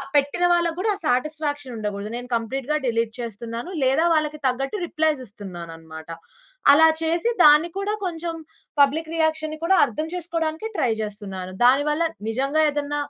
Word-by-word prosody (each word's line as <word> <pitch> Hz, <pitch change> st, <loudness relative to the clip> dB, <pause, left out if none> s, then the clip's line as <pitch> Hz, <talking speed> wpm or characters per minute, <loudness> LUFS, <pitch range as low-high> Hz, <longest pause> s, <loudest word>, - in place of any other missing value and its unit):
పెట్టిన 285 Hz, +5 st, +2 dB
వాళ్ళకి 340 Hz, -1 st, +1 dB
కూడా 425 Hz, +3 st, +1 dB
ఆ -, -, -10 dB
సాటిస్ఫాక్షన్ 290 Hz, +1 st, -1 dB
ఉండకూడదు. 210 Hz, -1 st, -4 dB
నేను 245 Hz, 0 st, -7 dB
కంప్లీట్‌గా 265 Hz, +5 st, -2 dB
డిలీట్ 230 Hz, -2 st, 0 dB
చేస్తున్నాను. 230 Hz, -, -6 dB
లేదా 270 Hz, +5 st, +3 dB
వాళ్ళకి 305 Hz, -1 st, 0 dB
తగ్గట్టు 270 Hz, +8 st, -1 dB
రిప్లైస్ 310 Hz, -3 st, +1 dB
ఇస్తున్నానన్నమాట. 165 Hz, -6 st, -10 dB, 0.6 s
అలా 320 Hz, +2 st, +7 dB
చేసి 335 Hz, +7 st, +1 dB
దాన్ని 300 Hz, +3 st, +7 dB
కూడా 410 Hz, +2 st, -1 dB
కొంచెం 335 Hz, -1 st, -3 dB, 0.5 s
పబ్లిక్ 315 Hz, +3 st, +2 dB
రియాక్షన్‌ని 315 Hz, -1 st, 0 dB
కూడా 385 Hz, -, +4 dB
అర్థం 285 Hz, +5 st, -4 dB
చేసుకోవడానికి 330 Hz, +2 st, -3 dB
ట్రై 245 Hz, -, +2 dB
జేస్తున్నాను. 195 Hz, -3 st, -6 dB
దానివల్ల 295 Hz, +5 st, +3 dB, 0.3 s
నిజంగా 275 Hz, +7 st, +1 dB
ఏదన్న 290 Hz, 0 st, -3 dB
290 Hz, 135 wpm, -23 LUFS, 230-320 Hz, 0.6 s, అలా